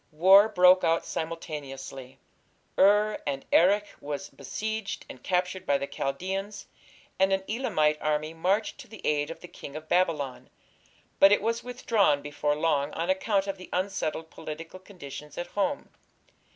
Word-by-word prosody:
War 190 +7 +7
broke 185 -2 +6
out 165 0 +2
simultaneously. 140 -5 -6 0.6
Ur 210 +2 +4
and 135 -1 -3
Erech 200 +5 +5 0.2
were 145 0 -3 0.2
besieged 220 -1 -4
and 130 - -11
captured 180 +2 -1
by 140 - +3
the 140 - -3
Chaldaeans, 190 +10 -4 0.5
and 190 0 +4
an 190 0 +1
Elamite 155 -11 +1
army 155 +1 -1
marched 190 +6 0
to - - -10
the 220 -1 -11
aid 145 0 +1
of 165 - -8
the 175 - -9
King 145 -4 -10
of 155 0 -7
Babylon, 155 -8 0 0.7
but 195 - +8
it 205 - +5
was 230 +1 -1
withdrawn 225 - +1
before 145 0 -1
long 150 -2 +1
on 170 +3 0
account 195 +1 +1
of 195 -1 -4
the 185 - -11
unsettled 175 -4 -2
political 165 +4 -8
conditions 150 -6 -10
at 175 - -3
home. 240 +8 -1
175 Hz, 150 wpm, -28 LUFS, 150-195 Hz, 0.7 s, but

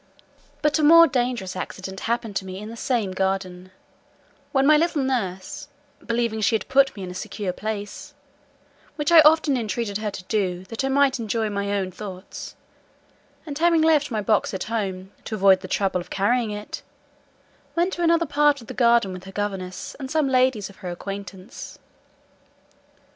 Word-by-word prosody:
But 300 +1 +2
a - - +1
more 335 +2 +9
dangerous 245 - -1
accident 190 0 -6
happened 235 -3 -1
to - - -2
me 185 0 -6
in 210 +2 -7
the - - -8
same 230 -5 -1
garden, 185 -1 -2 0.8
when 270 -1 +2
my 305 +2 +7
little 305 -2 +1
nurse, 195 -8 -3 0.4
believing 235 -2 -1
she 220 - +3
had 220 - -2
put 270 0 +3
me 195 - -7
in 180 - -6
a - - -7
secure 195 0 -4
place 205 0 -6 0.8
(which 295 +1 -1
I 335 - +9
often 310 -2 +5
entreated 220 -3 -2
her 215 -1 -2
to 195 - -8
do, 185 -3 -1
that 225 +3 -3
I 270 - 0
might 270 -1 +3
enjoy 220 -1 -1
my 200 0 -2
own 190 -2 -1
thoughts,) 185 0 -8 0.9
and 295 -3 -6
having 330 +1 +3
left 305 -3 +3
my 220 -4 -1
box 205 -1 +1
at 190 - -3
home, 195 -4 -3
to 220 - -3
avoid 195 -2 +5
the - - -8
trouble 190 -3 0
of - - -12
carrying 225 +4 +1
it, 210 0 -6 0.9
went 350 +3 +1
to 345 - -4
another 335 0 +3
part 290 0 +3
of 230 - -12
the - - -8
garden 235 -5 +3
with 185 0 -9
her 195 - -9
governess 195 -2 -4
and 265 -2 -6
some 310 -1 +1
ladies 255 -5 +2
of 195 - -15
her 185 - -6
acquaintance. 195 +2 -8
220 Hz, 180 wpm, -24 LUFS, 195-270 Hz, 0.9 s, more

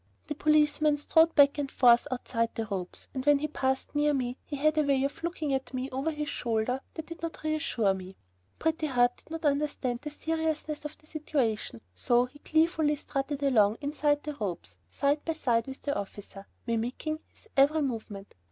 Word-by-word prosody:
The 300 - -3
policeman 300 0 +3
strode 320 +3 +4
back 285 0 +6
and 280 -2 -2
forth 240 0 +5
outside 235 -3 -2
the 225 - -2
ropes, 190 -4 -5
and 260 - -3
when 290 +1 +5
he 300 +2 -2
passed 265 -3 -1
near 295 0 +2
me, 250 -2 -1
he 295 - -6
had 310 +2 +2
a - - +6
way 275 -2 +2
of 275 - -3
looking 330 -4 -2
at 265 0 -2
me 255 +1 -3
over 270 +5 -1
his 300 -1 -3
shoulder 245 0 -1
that 320 - -5
did 335 +1 -9
not 330 -1 -5
reassure 295 -10 +1
me. 190 0 -8 0.4
Pretty 320 0 0
Heart 245 -3 +2
did - - -23
not 325 0 -5
understand 285 -4 0
the 300 - -5
seriousness 315 0 -2
of 300 - -6
the - - -25
situation, 265 - -2
so 240 - +2
he 285 +4 -16
gleefully 315 -1 +2
strutted 280 0 -3
along 220 -6 +4
inside 290 0 0
the 300 - -4
ropes, 175 - -4
side 285 - 0
by 325 - -1
side 240 -7 +1
with 265 0 -8
the 285 - -1
officer, 200 0 -7 0.2
mimicking 245 +7 -2
his - - -20
every 290 +3 +4
movement. 215 -6 -5
280 Hz, 190 wpm, -29 LUFS, 245-305 Hz, 0.4 s, back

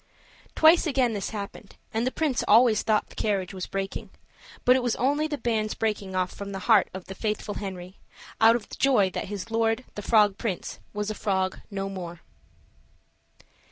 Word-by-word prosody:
Twice 325 +2 +6
again 255 -5 +2
this 200 -3 -3
happened, 205 -1 -7 0.2
and 225 +3 0
the - - 0
prince 295 -5 0
always 225 0 +6
thought 215 -1 +1
the - - -14
carriage 195 -3 -1
was 185 -1 -5
breaking; 195 0 -4 0.6
but 250 - +7
it 260 - +2
was 245 -2 0
only 290 +5 +1
the 300 -2 -3
bands 220 -3 -1
breaking 205 -4 -2
off 185 0 0
from 200 0 -7
the - - -3
heart 220 -4 +5
of 190 -1 -8
the 190 - -7
faithful 210 0 -3
Henry, 185 -1 -7 0.4
out 225 +1 +7
of 230 -3 -4
joy 215 -9 +4
that - - -3
his 205 +2 -6
lord, 225 +2 +1
the 205 - -6
frog 205 -2 +3
prince, 205 -7 -4
was 210 0 -3
a - - -2
frog 190 -2 -1
no 195 -2 -3
more. 175 -3 -7
210 Hz, 185 wpm, -26 LUFS, 195-235 Hz, 0.6 s, but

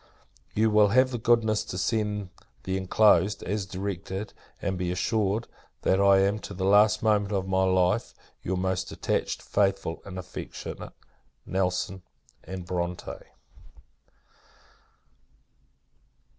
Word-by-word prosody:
You 110 +1 +3
will 105 -1 +6
have 130 +5 +4
the 120 - -3
goodness 110 -2 +2
to 90 - -6
send 105 -1 -1 0.3
the 95 - -2
inclosed, 95 0 +3
as 100 0 -2
directed; 95 +1 -5 0.3
and 95 - -2
be 90 -1 -2
assured, 105 +3 0 0.4
that 95 +1 +3
I 100 -1 +6
am, 100 +2 +1
to 100 - -8
the 95 +1 -2
last 105 +2 +5
moment 105 -2 +2
of 95 -2 -1
my 95 0 +2
life, 95 -1 +1 0.3
your 95 +1 -2
most 95 0 -1
attached, - - -2
faithful, 95 -4 0
and 95 -2 -8
affectionate, 90 0 -7 0.5
NELSON 95 +1 -1 0.4
& 95 +2 -7
BRONTE. 90 0 -3
95 Hz, 120 wpm, -27 LUFS, 95-105 Hz, 0.5 s, will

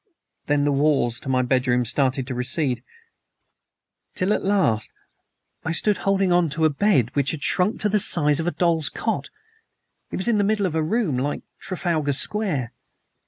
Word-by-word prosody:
"Then 145 -1 +2
the 145 - +2
walls 140 -4 +1
of - - -10
my 130 -1 +1
bedroom 125 -1 +1
started 130 +2 +2
to 130 - -5
recede, 125 +1 -1 1.3
till 190 +3 +1
at - - -2
last 185 - +1 0.7
I 160 - -2
stood 205 +4 +1
holding 195 -1 +1
on 175 -2 +3
to 160 - +2
a 155 - +3
bed 140 - +2
which 140 0 +1
had 155 -4 -4
shrunk 190 +4 +2
to 215 - +2
the 210 0 +1
size 150 -6 +2
of 165 - -2
a - - +1
doll's 165 -4 +1
cot, - - -3 0.8
in 210 +3 0
the - - +3
middle 205 0 +1
of 180 - -2
a 160 - 0
room 160 - 0
like 145 +3 -3 0.2
Trafalgar 165 -6 -1
Square! 145 - -1
155 Hz, 170 wpm, -23 LUFS, 135-190 Hz, 1.3 s, on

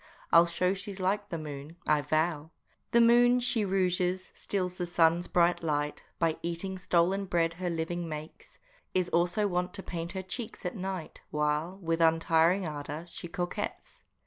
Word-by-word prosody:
I'll 170 +1 +7
show 180 +2 +1
she's 200 0 -6
like 200 +2 0
the 170 - -3
moon, 150 0 -7
I 150 -1 +4
vow! 155 +1 0 0.4
The 235 - +4
moon 240 +1 +6
she 240 -3 +2
rouges, 185 -1 0
steals 185 -2 -3
the 175 - -1
sun's 170 0 +3
bright 175 0 +3
light, 150 -2 -1 0.2
By 165 -2 +1
eating 175 +3 -4
stolen 185 +2 +2
bread 170 -3 +1
her 180 - 0
living 170 +1 -3
gets, 155 0 -8 0.4
Is 185 -1 +1
also 175 +5 +2
wont 180 0 -1
to 195 - -5
paint 170 0 -5
her 190 -1 -4
cheeks 215 +2 -6
at 180 - -2
night, 190 -4 -5
While, 150 +4 -1
with 165 0 0
untiring 165 +3 +3
ardor, 150 +1 -5
she 175 - -7
coquets. 175 +1 -5
175 Hz, 165 wpm, -30 LUFS, 165-190 Hz, 0.4 s, I'll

